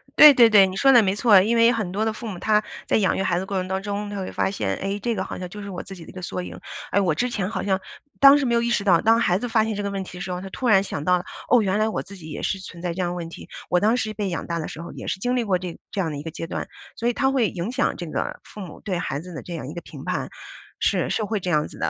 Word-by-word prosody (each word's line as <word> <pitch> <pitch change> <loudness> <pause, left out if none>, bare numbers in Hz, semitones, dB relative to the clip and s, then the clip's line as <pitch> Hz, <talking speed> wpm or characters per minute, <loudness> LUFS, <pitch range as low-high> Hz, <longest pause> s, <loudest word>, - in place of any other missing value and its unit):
对 300 -1 +10
对 235 -3 +7
对， 205 -3 +7
你 185 - -6
说 270 +7 +5
的 240 -4 +7
没 190 0 +1
错， 205 -3 +6
因 220 +5 +1
为 230 0 +6
很 215 -7 -2
多 205 +3 -1
的 220 - +1
父 230 +1 -7
母 190 -5 -6
他 210 +1 +2 0.2
在 - - +3
养 200 -4 +2
育 - - 0
孩 180 - +1
子 175 - 0
的 - - -4
过 195 0 -3
程 185 - -3
当 190 +1 -2
中， 205 0 -3
他 205 - -5
会 190 - -4
发 - - 0
现， 100 - -2
哎， 195 +1 -2
这 235 +2 -1
个 190 - -2
好 - - -6
像 180 - -5
就 210 +3 -8
是 200 - -7
我 180 -2 -6
自 195 - -10
己 175 - -11
的 - - -13
一 - - -9
个 185 - -9
缩 180 +1 -4
影。 180 - -8 0.3
哎， - - +3
我 185 -5 +2
之 250 +7 0
前 195 -5 -2
好 225 - -3
像 190 -1 +1 0.4
当 275 +1 +9
时 285 - 0
没 235 -2 +2
有 235 - +3
意 235 - 0
识 235 -4 +1
到， 180 -4 +4
当 225 +1 +4
孩 180 -5 +2
子 245 - -3
发 225 -2 +3
现 220 -1 -2
这 205 - -3
个 200 - -2
问 195 -1 -3
题 180 - -10
的 - - -7
时 185 - -4
候， 180 0 -3
他 195 - -7
突 250 +6 -3
然 205 -4 +6
想 145 -7 -5
到 180 +3 +3
了， 180 - -7 0.2
哦， 245 - +6
原 195 -1 +1
来 215 +1 +2
我 - - -2
自 200 +2 -12
己 160 -3 -11
也 150 - -6
是 195 - -1
存 175 -2 -10
在 175 -1 -2
这 175 - -8
样 175 - 0
的 - - -4
问 170 -2 -5
题， - - -11 0.2
我 180 - +3
当 215 +5 +3
时 215 -3 -2
被 205 -2 -2
养 170 - -4
大 170 -1 -2
的 155 - -4
时 160 - -8
候 170 - -8
也 - - -8
是 190 - -2
经 245 +5 0
历 245 - +1
过 195 -4 +1
这 180 -2 -6
这 200 - -1
样 165 -4 -2
的 145 - -5
一 145 - -7
个 160 - -6
阶 165 - -6
段。 - - -4 0.3
所 235 - -2
以 240 - +2
他 265 +2 +2
会 255 -5 +2
影 180 +5 -4
响 265 +2 0
这 175 - -6
个 - - -3
父 210 - -11
母 180 -5 -9
对 190 -4 -2
孩 145 -5 -3
子 180 +3 -10
的 160 - -7
这 175 - -7
样 160 -5 -5
一 - - -7
个 170 - -6
评 - - -11
判， - - -2 0.5
是， - - +1
是 220 - 0
会 215 0 -1
这 180 - -4
样 150 -2 +2
子 - - -13
的， - - -1
195 Hz, 385 characters per minute, -23 LUFS, 180-220 Hz, 0.5 s, 对